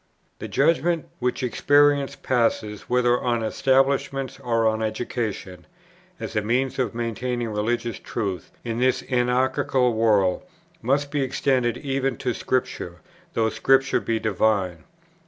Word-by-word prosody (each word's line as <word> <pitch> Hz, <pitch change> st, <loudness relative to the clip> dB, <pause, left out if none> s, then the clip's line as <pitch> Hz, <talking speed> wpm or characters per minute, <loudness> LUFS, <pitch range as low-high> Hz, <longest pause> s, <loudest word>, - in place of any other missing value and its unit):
The -, -, -5 dB
judgment, 165 Hz, +2 st, +1 dB
which 125 Hz, +2 st, -1 dB
experience 145 Hz, +3 st, +3 dB
passes 115 Hz, -4 st, -1 dB
whether 125 Hz, 0 st, +2 dB
on 120 Hz, -2 st, 0 dB
establishments 135 Hz, +2 st, +1 dB
or 115 Hz, -2 st, 0 dB
on 110 Hz, 0 st, 0 dB
education, 110 Hz, -4 st, -4 dB, 0.5 s
as -, -, -6 dB
a 105 Hz, -, +2 dB
means 125 Hz, +5 st, 0 dB
of 120 Hz, -4 st, -1 dB
maintaining 120 Hz, +1 st, -2 dB
religious 115 Hz, +2 st, -2 dB
truth 100 Hz, -7 st, -4 dB
in 115 Hz, -1 st, -3 dB
this 130 Hz, +1 st, +2 dB
anarchical 125 Hz, 0 st, +2 dB
world, 105 Hz, -5 st, +2 dB, 0.4 s
must 140 Hz, +4 st, 0 dB
be 145 Hz, -, 0 dB
extended 130 Hz, -2 st, +1 dB
even 135 Hz, -1 st, -2 dB
to 125 Hz, -2 st, -1 dB
Scripture, 110 Hz, -9 st, -2 dB, 0.4 s
though 110 Hz, -1 st, +2 dB
Scripture 135 Hz, +4 st, +3 dB
be 115 Hz, -, -1 dB
divine. 100 Hz, -4 st, 0 dB
120 Hz, 125 wpm, -24 LUFS, 110-130 Hz, 0.5 s, experience